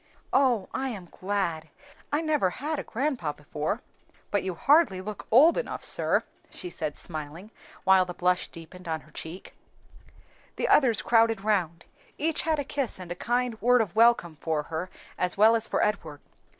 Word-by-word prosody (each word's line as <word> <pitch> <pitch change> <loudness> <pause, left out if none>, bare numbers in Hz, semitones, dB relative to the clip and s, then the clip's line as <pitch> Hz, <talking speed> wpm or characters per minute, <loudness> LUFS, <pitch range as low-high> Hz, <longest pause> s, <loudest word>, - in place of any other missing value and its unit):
"Oh, 250 -7 +3
I 265 0 -1
am 200 -7 -7
glad! 175 -4 -3 0.4
I 295 +2 +1
never 300 - +1
had 295 - -3
a - - -4
grandpa 245 - -2
before. 150 +9 -4 0.5
But 205 - +1
you 185 -2 -4
hardly 275 - +4
look 205 +2 -7
old 305 - +6
enough, - - -5
sir," - - +2 0.3
she 360 - -8
said, 155 -3 -4
smiling, 160 +5 -7 0.3
while 190 -1 +5
the 180 -1 -7
blush 180 0 +1
deepened 170 +2 -12
on 160 -1 -2
her - - -20
cheek. 165 +4 -8 1.0
The - - -1
others 235 -9 +4
crowded 225 -3 +3
round; 180 -6 0 0.3
each 320 +1 +1
had 320 -1 0
a 285 - -1
kiss 275 -2 -2
and 175 -1 -7
kind 245 -1 -1
word 245 +2 +5
of 215 -5 -1
welcome 225 -8 +4
for 155 -1 -1
her 170 +4 -3 0.3
as 180 +1 0
well 220 +3 +6
as 225 -1 0
for - - 0
Edward. 165 -8 -2
200 Hz, 170 wpm, -27 LUFS, 175-250 Hz, 1.0 s, old